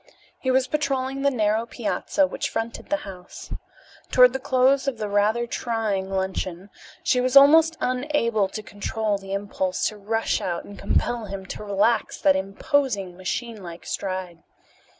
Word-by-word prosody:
He 260 - -2
was 260 0 +3
patrolling 270 -2 -1
the 280 - +4
narrow 220 -2 +1
piazza 245 +5 0
which - - -3
fronted 225 +1 -4
the 300 - +2
house. 185 -2 -9 0.6
Toward 250 0 +6
the 265 - -2
close 265 +1 +2
of 265 -4 -1
the 215 -1 -3
rather 210 +4 +2
trying 220 -5 -2
luncheon 190 0 -3 0.3
she 250 - +2
was 255 +2 +4
almost 320 +4 +7
unable 250 -5 +1
to 215 +3 -7
control 205 0 -2
the 195 0 -7
impulse 195 -2 -1
to 215 - -11
rush 225 +3 -1
out 175 -2 -2
and 200 - -11
compel 240 -2 0
him 195 -1 -6
to 200 - -7
relax 210 +3 +1
that 190 - +4
imposing, 195 - -1
machine 215 +4 -4
like 170 -2 -9
stride. 185 -3 -4
220 Hz, 155 wpm, -24 LUFS, 195-255 Hz, 0.6 s, almost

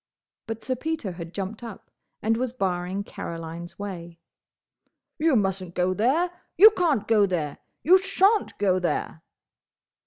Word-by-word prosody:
But 225 0 -5
Sir 260 - -1
Peter 305 -6 -3
had 170 -1 -8
jumped 195 +4 -5
up, 230 -4 -10 0.3
and 225 +1 +2
was 245 +1 -2
barring 190 -3 -2
Caroline's 170 -1 -7
way. 175 -4 -7 1.0
"You 315 -2 +3
mustn't 190 -4 -1
go 180 +1 +1
there!—You 345 - +4
can't 330 - +1
go 210 -3 +4
there!—You 180 - +1
shan't 390 +2 +2
go 190 -2 +2
there!" 170 -2 -2
205 Hz, 125 wpm, -25 LUFS, 180-270 Hz, 1.0 s, there!—You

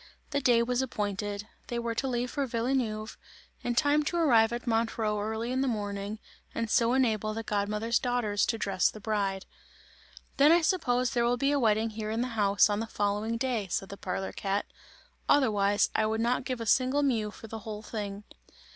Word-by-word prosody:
The 285 - 0
day 240 -3 +4
was 250 +1 0
appointed. 205 -4 -3 0.2
They 240 - -3
were 235 -1 -2
to 265 +4 -2
leave 245 -1 -1
for 280 -2 -1
Villeneuve, 230 -3 -2 0.4
in 240 -1 -1
time 290 +3 +3
to 345 - -1
arrive 235 -9 +4
at 240 +1 -4
Montreux 225 -2 0
early 220 +3 -3
in 260 +1 0
the 270 - +1
morning, 205 -2 -3 0.4
and 230 -1 -2
so 235 -1 +3
enable 220 -5 +1
the 225 - -3
god 205 -1 -1
mother's 220 +3 0
daughters 245 -5 0
to 230 - 0
dress 195 -4 +1
the 215 - -10
bride. 200 -2 -1 0.9
"Then 285 +3 +6
I 340 +1 +5
suppose 255 -8 +1
there 240 - +1
will 245 +1 +2
be 275 +2 +1
a 290 - +2
wedding 220 -1 +2
here 215 0 -5
in 225 +2 -1
the 250 - -1
house, 205 -3 +3
on 205 -1 -1
the 225 - -3
following 210 +2 -1
day," 235 -5 -1
said 195 - -2
the 200 - -6
parlour 190 0 -4
cat, 200 +1 -2 0.6
"otherwise, 205 -7 +3
I 215 - +2
would 220 +1 -1
not 245 +3 0
give 255 -2 -3
a - - -3
single 260 +5 +3
mew 225 -6 +1
for 210 - -12
the 225 0 -7
whole 215 0 -7
thing!" 205 -2 -5
225 Hz, 200 wpm, -29 LUFS, 210-245 Hz, 0.9 s, Then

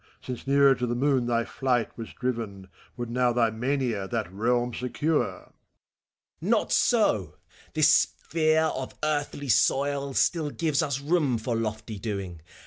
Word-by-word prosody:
Since 125 +1 -7
nearer 140 0 +5
to 125 -1 -2
the 120 - -1
moon 130 -1 +1
thy 115 -1 +1
flight 125 -4 -1
was 115 -2 -7
driven, 115 -7 -4 0.3
Would 120 -1 -4
now 125 0 +2
thy 115 -2 +2
mania 120 -4 -1
that 110 -4 -3
realm 120 +3 0
secure 145 +6 0
T - - -5
FAUST. - - -25 0.9
Not - - +1
so! 105 - +2 0.4
This 155 -1 +5
sphere 160 0 +2
of 130 0 -6
earthly 145 -2 -2
soil 140 +2 +2
Still 160 -4 +2
gives 155 -2 0
us 140 -4 -1
room 145 -5 +1
for 115 +2 -2
lofty 110 -1 -4
doing. 95 -5 -5
125 Hz, 150 wpm, -27 LUFS, 115-145 Hz, 0.9 s, nearer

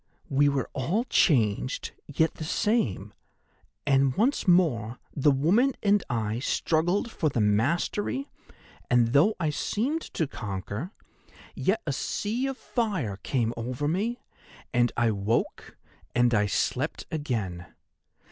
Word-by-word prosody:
We 145 +1 +4
were 140 -2 -1
all 165 - 0
changed, 125 - +1 0.2
yet 160 +3 +1
the - - -7
same, 130 - 0 0.7
and 135 -2 +3
once 240 +4 +1
more 130 - +3 0.2
the 145 +1 +3
woman 180 - +3
and 205 -1 +3
I 115 -2 -1
struggled 175 - 0
for 155 - 0
the 125 - -2
mastery, 155 - +1 0.6
and 120 -2 +4
though 185 +10 +5
I 155 -3 0
seemed 260 - -1
to 160 - +1
conquer, 100 - -5 0.6
yet 215 +4 0
a 145 - -1
sea 225 - -2
of 270 -1 -4
fire 185 - -2
came 115 +2 -1
over 125 +5 -3
me, 215 +10 -1 0.5
and 120 -1 +3
I 120 -1 +3
woke 105 +3 -2 0.4
and 120 0 +3
I 105 -2 +3
slept 130 +8 -1
again. 110 - -3
140 Hz, 130 wpm, -27 LUFS, 115-190 Hz, 0.7 s, though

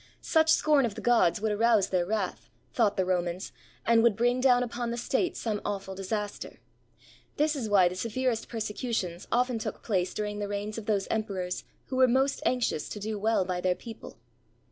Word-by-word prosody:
Such 320 -1 +2
scorn 300 -3 +4
of 205 - -7
the - - -6
gods 230 -5 +3
would 220 0 0
arouse 220 -1 +3
their 180 -2 0
wrath, 205 -3 -3 0.2
thought 210 -4 +2
the 190 - +2
Romans, 180 0 -1 0.3
and 230 0 +5
would 230 -3 +4
bring 245 +3 +1
down 250 -2 +5
upon 240 0 -3
the 235 - -3
state 265 +8 -1
some 215 -3 -2
awful 195 -1 -4
disaster. 205 +2 -4 0.8
This 305 +1 +2
is 240 -6 -3
why 195 -3 +5
the 175 - -2
severest 230 +4 -2
persecutions 210 -5 -3
often 245 -1 +1
took - - -5
place 185 -5 -1
during 210 0 -3
the 205 - -2
reigns 205 +2 -4
of 215 - -11
those 200 -3 +1
emperors 190 -5 -2 0.2
who 260 - -2
were 260 0 +6
most 265 +3 +1
anxious 245 -11 0
to 210 - -6
do 210 +1 -3
well 215 -2 +2
by 180 -1 -2
their 180 0 +1
people. 225 +2 -10
220 Hz, 190 wpm, -28 LUFS, 195-240 Hz, 0.8 s, were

